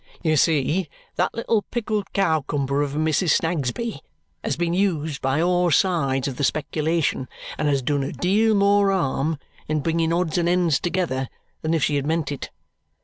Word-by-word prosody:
You 160 -2 +2
see, 155 +3 +2 0.3
that 180 - +1
little 230 -1 +1
pickled 215 -3 -3
cowcumber 145 -6 0
of 145 -1 -2
a - - -2
Mrs. 155 +1 +2
Snagsby 160 - -2 0.4
has - - -1
been 170 -1 0
used 160 -6 0
by 135 +3 +1
all 175 +1 +2
sides 140 -6 +2
of 130 -3 -5
the - - -2
speculation 155 -1 0 0.3
and 150 - -1
has 140 -2 +1
done 145 +2 +1
a 135 - -3
deal 215 +4 +2
more 200 0 +4
harm 160 -3 0 0.3
in 155 0 0
bringing 165 +2 0
odds 175 0 +1
and 170 0 +1
ends 175 -5 +2
together 170 -8 -1 0.3
than 160 +1 0
if 155 - +1
she 145 +1 +2
had 140 0 -2
meant 160 -1 0
it. 140 - -5
160 Hz, 175 wpm, -23 LUFS, 145-180 Hz, 0.4 s, more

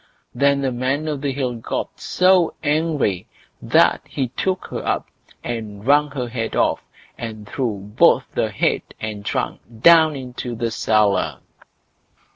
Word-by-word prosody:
Then 140 0 +2
the 135 -1 0
Man 130 +5 -1
o' 150 - -1
the 140 0 -2
Hill 130 -2 -2
got 115 - -4
so 185 -2 +3
angry 150 - 0 0.3
that - - +3
he 130 -3 -2
took 185 +8 -2
her - - -4
up - - -1 0.4
and 110 -3 -5
wrung 145 +2 +4
her 130 -3 -4
head 115 -1 -4
off, - - +1 0.4
and 110 -2 -7
threw 120 -5 -2 0.2
both - - +5
head - - 0 0.2
and 105 -2 -5
trunk - - -2 0.2
down 160 0 +7
into 125 -2 -6
the 115 0 -2
cellar. 100 - +1
130 Hz, 140 wpm, -21 LUFS, 110-145 Hz, 0.4 s, down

